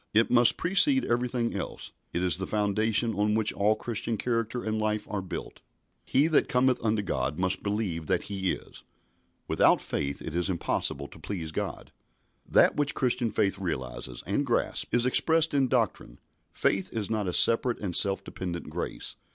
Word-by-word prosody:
It 115 +1 +4
must 120 -1 +5
precede 265 - +3
everything 120 0 -1
else. - - -6 0.2
It 90 - -2
is 90 -3 +2
the 95 - -3
foundation 110 +2 0
on 105 +1 +1
which 110 -1 +2
all 105 +2 +2
Christian 115 0 -2
character 115 +1 -2
and 110 0 -2
life 105 0 -1
are 105 - -3
built. 95 - -7 0.4
"He 140 - +2
that 160 -2 +2
cometh 125 -1 +2
unto 110 -2 +1
God 65 -5 -2
must 95 0 -1
believe 100 -6 -2
that 95 -2 +1
he 95 -2 -2
is." - - -10 0.6
"Without - - +4
faith 70 0 -3
it - - -7
is 90 +3 0
impossible 75 -5 -2
to - - -14
please 85 -6 -5
God." - - -5 0.6
That - - +5
which 145 -1 0
Christian 125 -2 +1
faith 100 -2 0
realises 65 -8 -4
and - - 0
grasps - - 0
is 120 0 +2
expressed 160 +5 +2
in 135 -2 +3
doctrine. 115 - -1 0.3
Faith 95 -1 0
is 110 -2 -3
not 105 -3 -1
a - - 0
separate 115 +4 +5
and 95 -5 -3
self 100 -1 +4
dependent 85 -3 -6
grace. - - -5
105 Hz, 175 wpm, -28 LUFS, 95-120 Hz, 0.6 s, must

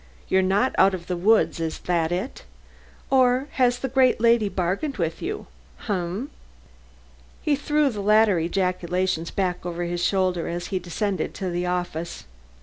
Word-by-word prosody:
"You're 190 - +4
not 195 +7 +2
out 195 0 +5
of 170 -2 -9
the 180 - -2
woods, 205 +1 +3
is 160 -1 -2
that 170 -2 0
it? 190 +9 -3 0.7
Or 260 +1 +3
has 245 -2 +2
the 265 - -3
great 260 -2 +3
lady 230 -2 +4
bargained 195 - -2
with 165 -3 -2
you? 410 +4 -4 0.4
Um? 205 - +1
Um?" 185 +9 -3 1.1
He 300 -3 +2
threw 295 +1 +1
the 210 -3 -5
latter 210 -2 +4
ejaculations 180 0 -1
back 185 -2 -2
over 175 0 -3
his 175 0 -2
shoulder 185 -3 +1
as 175 +1 -4
he 185 - +1
descended 190 +3 -3
to 190 -2 -3
the 175 +1 -2
office. 175 -2 -3
190 Hz, 160 wpm, -24 LUFS, 175-235 Hz, 1.1 s, out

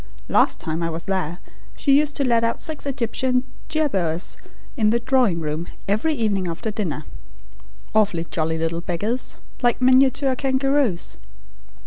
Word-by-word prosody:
Last - - +3
time 160 +1 -2
I 165 - 0
was 165 +1 -4
there 180 -3 -2 0.4
she 275 -2 +3
used 295 -1 0
to 280 - +1
let 235 -3 +3
out 230 0 0
six 310 -2 -4
Egyptian 255 -1 0 0.3
jerboas 195 - 0 0.4
in 220 -6 +3
the 235 +2 +3
drawing 240 -8 +2
room 155 +2 -3 0.2
every 220 +11 +1
evening 205 -6 0
after 170 +6 -3
dinner, 170 -8 -3 0.9
awfully 200 -6 +2
jolly 160 -1 -1
little 165 +1 -1
beggars, 205 +9 -2 0.2
like 240 -1 +2
miniature 260 +1 +4
kangaroos. 270 -6 +1
220 Hz, 140 wpm, -22 LUFS, 170-260 Hz, 0.9 s, miniature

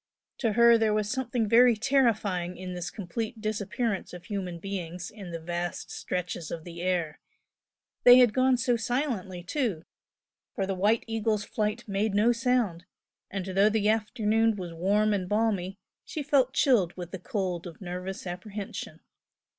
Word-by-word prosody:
To 225 -4 +1
her 235 +1 +6
there 215 -1 +2
was 210 0 0
something 245 -3 -1
very 235 +2 +6
terrifying 215 -8 +1
in 185 0 -6
this 175 -3 -4
complete 215 +6 -5
disappearance 215 -1 -2
of 180 0 -9
human 190 -4 -4
beings 180 -1 -5
in 200 -4 -9
the 165 -1 -5
vast 175 +1 -4
stretches 180 -3 -4
of 165 - -5
the 170 0 -8
air 175 -4 -1 0.8
they 245 0 +10
had 245 -4 +6
gone 255 +1 +3
so 245 0 +2
silently, 230 -8 -2
too, 205 - -2 0.7
for 195 - 0
the 195 - -2
"White 205 +5 +2
Eagle's" 220 -2 0
flight 215 +3 -2
made 200 +1 0
no 215 +4 +4
sound, 235 -8 0 0.4
and 195 -2 -4
though 195 +2 +3
the 215 -1 +1
afternoon 220 0 +2
was 180 -4 -6
warm 205 +5 +2
and 185 -3 -2
balmy 205 -3 0 0.3
she 305 - -5
felt 270 -3 +3
chilled 225 - +2
with 175 -1 -7
the 190 - -6
cold 180 -2 -3
of 170 - -11
nervous 180 +1 -6
apprehension. 195 +3 -6
205 Hz, 160 wpm, -28 LUFS, 180-230 Hz, 0.8 s, they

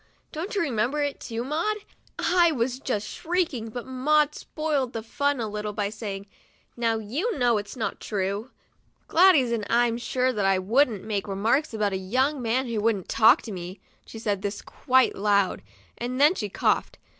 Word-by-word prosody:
Don't 345 +7 -5
you 405 - +2
remember 265 +1 0
it, 285 -1 -3
too, 230 0 -4
Maud! 330 +11 -1 0.4
' - - -46
I 350 -2 +3
was 255 -2 -1
just 215 -6 -2
shrieking, 315 -10 -2
but 240 +2 -6
Maud 295 +3 +2
spoiled 295 -7 -2
the 225 - -4
fun 285 +4 0
a 225 - -2
little 210 0 -4
by 205 0 -2
saying, 205 -2 -6 0.2
' - - -34
' - - -43
Now 230 -1 +1
you 285 - -2
know 240 -3 +3
that's 205 +4 -6
not 220 - -3
true, 200 +3 -3 0.6
Gladys, 320 -8 +5
and 230 -3 -1
I'm 235 0 +2
sure 255 +1 0
that 210 - -2 0.2
1 185 - -8
wouldn't 235 -3 +2
make 210 -2 -3
remarks 220 +9 +1
about 210 -3 -1
a - - 0
young 260 +9 0
man 245 +3 0
who 230 -3 -2
wouldn't 210 -4 0
talk 230 +7 +5
to 225 - -7
me." 180 0 -7 0.3
She - - -9
said 205 -3 -2
this 200 +1 -4
quite 260 -1 +2
loud, 200 -1 +1 0.4
and 250 +2 -3
then 295 +4 +6
she 210 - -4
coughed. - - 0
235 Hz, 190 wpm, -26 LUFS, 210-280 Hz, 0.6 s, then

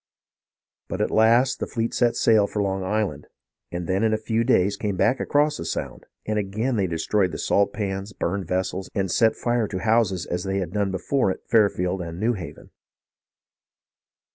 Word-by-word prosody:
But - - -4
at - - 0
last 120 +4 +4
the - - -3
fleet 115 0 -2
set 120 -1 +2
sail 110 -3 +4
for 105 - -4
Long 95 -1 -1
Island, 95 -7 -2 0.4
and 85 0 -4
then 95 +3 0
in 110 -1 +2
a - - -1
few 110 +1 -1
days 100 -5 +2
came 100 -1 -3
back 130 +7 +2
across 150 +1 +1
the - - -5
Sound, - - -5 0.2
and 105 0 0
again 110 +6 -1
they 100 -4 +1
destroyed 90 +3 0
the - - -5
salt 100 0 +2
pans, 100 -1 -4
burned 95 -1 -3
vessels, 95 +1 -2
and 95 -3 0
set 115 -1 +3
fire 120 -2 0
to 95 - -4
houses 110 -5 +2
as 90 0 -3
they 95 0 -2
had 90 -2 -3
done 100 -2 0
before 95 +6 0
at 95 - -5
Fairfield 95 -4 +2
and 85 0 -6
New 115 +4 +1
Haven. 90 -9 -9
100 Hz, 190 wpm, -24 LUFS, 95-110 Hz, 0.4 s, last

